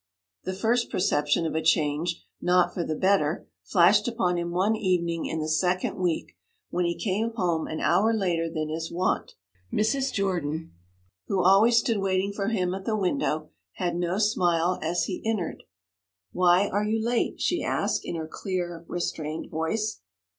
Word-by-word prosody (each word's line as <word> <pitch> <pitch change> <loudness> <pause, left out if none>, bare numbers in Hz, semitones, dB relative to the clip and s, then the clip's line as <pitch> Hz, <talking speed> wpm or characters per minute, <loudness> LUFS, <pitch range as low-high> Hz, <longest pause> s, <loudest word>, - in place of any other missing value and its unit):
The 185 - -3
first 235 +4 +1
perception 150 -3 +1
of 160 - -2
a 160 - 0
change 160 +1 +1 0.2
not 180 0 +3
for 175 - -2
the 155 - -2
better 185 -3 +1 0.2
flashed 195 +4 +4
upon 185 -7 0
him 170 0 -3
one 190 +5 +1
evening 175 -5 0
in 160 - -3
the 155 - -2
second 180 +4 +1
week, 175 -3 -1 0.4
when 175 0 0
he 170 0 -1
came 220 +3 -1
home 170 -6 0
an 155 - -4
hour 220 +3 +3
later 175 -6 0
than 155 -2 -3
his 160 +1 -4
wont. 180 +2 -1 0.4
Mrs. 260 +6 +1
Jordan, 170 -5 -2 0.6
who 190 -2 +1
always 205 +6 +6
stood 230 -2 +2
waiting 195 +1 0
for 200 -1 -2
him 185 -5 0
at 190 0 -6
the 220 -1 0
window, 180 - -1 0.2
had 175 -1 -2
no 175 +1 -1
smile 180 -4 +2
as 170 +2 0
he 185 - -4
entered. 220 -5 -2 0.7
'Why 180 - +4
are 205 +2 0
you 215 +1 0
late?' 235 +2 0
she - - +1
asked, - - 0
in - - -4
her 160 -1 -4
clear, 175 -1 -4
restrained 160 -2 -4
voice. 210 +8 -2
180 Hz, 170 wpm, -26 LUFS, 165-205 Hz, 0.7 s, always